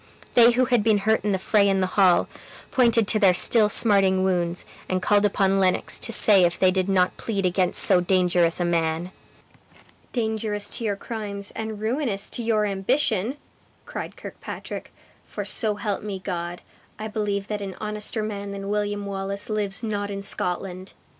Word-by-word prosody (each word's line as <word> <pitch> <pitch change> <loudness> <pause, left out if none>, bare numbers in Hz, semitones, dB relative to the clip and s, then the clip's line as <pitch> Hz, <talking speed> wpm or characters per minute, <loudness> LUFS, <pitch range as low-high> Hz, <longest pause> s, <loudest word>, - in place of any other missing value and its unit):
They 235 0 +6
who 255 +2 +2
had 245 -3 +2
been 220 -1 +3
hurt 220 +2 +1
in 210 - 0
the 190 - +1
fray 200 +1 +2
in 195 -1 +1
the 185 - +2
hall, 185 -3 +4 0.4
pointed 235 -4 +3
to 215 - +2
their 190 -4 +5
still 210 +3 +4
smarting 195 -4 +3
wounds, 175 -2 -1 0.2
and 185 - 0
called 205 +2 +2
upon 195 -1 +2
Lennox 185 -1 0
to - - -3
say 205 -3 +5
if 175 0 +1
they 185 -1 +4
did 185 +1 -1
not 185 -1 +2
plead 200 -4 -2
against 180 0 +2
so 185 -3 +6
dangerous 180 -2 +2
a 175 - 0
man? 165 +1 -1 1.0
"Dangerous 220 -3 -2
to - - -5
your 205 -3 0
crimes, 205 -2 -6
and 220 -1 -5
ruinous 220 -2 -2
to - - -4
your 220 -2 +1
ambition!" 215 +3 0 0.5
cried - - -7
Kirkpatrick; - - -8 0.3
"for - - -6
so 215 -3 0
help 205 -1 -3
me 205 -2 -5
God, 175 -2 -5 0.4
I 215 - -5
believe 210 -2 -2
that 210 -1 -3
an 195 -2 -6
honester 210 +1 -3
man 200 -2 -5
than 195 0 -6
William 205 0 -2
Wallace 200 +1 -4
lives 210 0 -1
not 205 -2 -2
in 200 0 -5
Scotland! 185 0 -3
200 Hz, 175 wpm, -24 LUFS, 190-215 Hz, 1.0 s, They